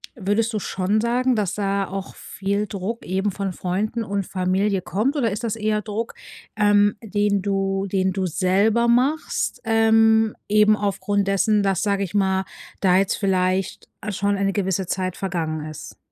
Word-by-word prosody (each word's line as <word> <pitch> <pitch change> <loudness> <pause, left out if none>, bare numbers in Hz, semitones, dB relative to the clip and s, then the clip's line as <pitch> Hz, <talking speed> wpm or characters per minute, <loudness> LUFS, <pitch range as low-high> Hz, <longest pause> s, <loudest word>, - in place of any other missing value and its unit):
würdest 220 +2 0
du 215 - 0
schon 195 +3 0
sagen, 245 +2 +1
dass 200 -4 -1
da 200 -1 -1
auch 195 0 -6
viel 200 +1 -3
Druck 200 +4 -5
eben 190 +2 -1
von 195 -1 -3
Freunden 210 +7 -2
und 200 -2 -2
Familie 190 +2 0
kommt 220 - -1
oder 235 -7 +1
ist 215 +4 -4
das 225 -1 -1
eher 215 -1 0
Druck, 215 +2 -4 0.4
ähm, 205 -1 +4
den 205 -2 0
du 195 0 -1
den 190 0 +1
du 190 0 -1
selber 200 +7 +2
machst, 265 +6 0
ähm, 225 -1 +4
eben 210 +1 +5
aufgrund 200 -1 -1
dessen, 205 +1 +2
dass, 195 -2 +1
sage 200 -1 +1
ich 190 - -6
mal, 190 -2 +1 0.4
da 185 -2 +4
jetzt 195 0 +1
vielleicht 185 -1 0 0.2
schon 200 +1 0
eine 195 0 +1
gewisse 190 -1 -1
Zeit 185 -1 -2
vergangen 160 -5 -3
ist. 155 - -10
200 Hz, 165 wpm, -22 LUFS, 190-215 Hz, 0.4 s, eben